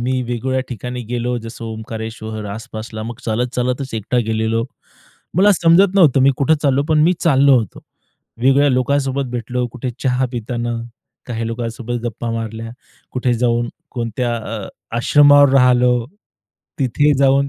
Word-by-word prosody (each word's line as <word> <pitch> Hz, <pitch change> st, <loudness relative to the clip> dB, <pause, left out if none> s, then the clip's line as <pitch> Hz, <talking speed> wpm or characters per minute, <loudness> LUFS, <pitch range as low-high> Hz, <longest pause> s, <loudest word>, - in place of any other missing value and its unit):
मी 130 Hz, +1 st, -1 dB
वेगवेगळ्या 125 Hz, +2 st, -2 dB
ठिकाणी 125 Hz, +1 st, -5 dB
गेलो, 120 Hz, +1 st, -2 dB
जसं 115 Hz, +1 st, -9 dB
ओंकारेश्वर 110 Hz, -1 st, -6 dB
आसपासला. 110 Hz, +1 st, -7 dB
मग 115 Hz, +1 st, -7 dB
चालत-चालतच 125 Hz, +3 st, -2 dB
एकटा 110 Hz, +3 st, -1 dB
गेलेलो. 110 Hz, +1 st, 0 dB, 0.7 s
मला 205 Hz, +2 st, +6 dB
समजत 180 Hz, +2 st, +4 dB
नव्हतं 155 Hz, -9 st, +5 dB
मी 135 Hz, -, +6 dB
कुठे 155 Hz, +2 st, +3 dB
चाललो, 140 Hz, -1 st, +2 dB
पण 155 Hz, -1 st, +3 dB
मी 175 Hz, +3 st, +4 dB
चाललो 140 Hz, -4 st, +5 dB
होतो. 110 Hz, -5 st, -5 dB, 0.6 s
वेगवेगळ्या 135 Hz, +4 st, +3 dB
लोकांसोबत 135 Hz, +1 st, 0 dB
भेटलो. 125 Hz, +1 st, -2 dB
कुठे 125 Hz, 0 st, -4 dB
चहा 130 Hz, -1 st, +1 dB
पिताना 120 Hz, 0 st, -3 dB, 0.5 s
काही 115 Hz, -2 st, -3 dB
लोकांसोबत 115 Hz, +1 st, -4 dB
गप्पा 115 Hz, 0 st, -4 dB
मारल्या. 115 Hz, 0 st, -5 dB, 0.4 s
कुठे 125 Hz, -1 st, 0 dB
जाऊन 120 Hz, 0 st, 0 dB, 0.2 s
कोणत्या 120 Hz, 0 st, -2 dB
अ, 110 Hz, -3 st, -6 dB, 0.3 s
आश्रमावर 145 Hz, +3 st, +6 dB
राहिलो. 125 Hz, -2 st, +4 dB, 0.7 s
तिथे 145 Hz, +3 st, +2 dB
जाऊन 140 Hz, 0 st, +3 dB
125 Hz, 135 wpm, -18 LUFS, 115-135 Hz, 0.7 s, मला